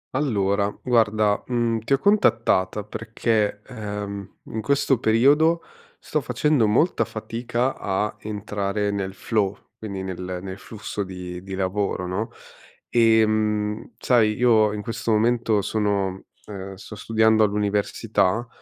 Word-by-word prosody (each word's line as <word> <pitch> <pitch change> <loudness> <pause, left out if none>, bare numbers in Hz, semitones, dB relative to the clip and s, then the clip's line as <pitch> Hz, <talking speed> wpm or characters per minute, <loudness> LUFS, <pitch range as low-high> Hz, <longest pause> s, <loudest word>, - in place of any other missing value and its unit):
Allora, 100 -7 +1
guarda, 110 -4 +2
mhmm, 120 -2 0
ti 115 +5 -1
ho - - +5
contattata 115 - +2
perché, 110 -1 -1
ehm, 105 -4 -6
in 110 - -5
questo 140 -1 +2
periodo 145 +9 +4 0.3
sto - - -2
facendo 150 -8 +2
molta 140 +12 +2
fatica 120 +3 -2
a 105 +2 -2
entrare 105 -1 -2
nel 95 -1 -3
flow, 100 -1 -1 0.2
quindi 100 -3 -6
nel 90 -1 -5
nel 95 0 -7
flusso 105 -1 -5
di 90 -1 -7
di 95 0 -6
lavoro, 95 0 -1
no, 95 +6 -2 0.6
ehm, 110 -1 +2
sai, 115 -4 +3
io 110 -3 +4
in 105 -1 -5
questo 115 +1 -4
momento 110 -1 +2
sono 100 -3 -1 0.2
uhm, 95 -2 -7
sto 100 +3 -10
studiando 110 +1 +3
all'università. 105 +1 0
105 Hz, 120 wpm, -23 LUFS, 100-115 Hz, 0.6 s, ho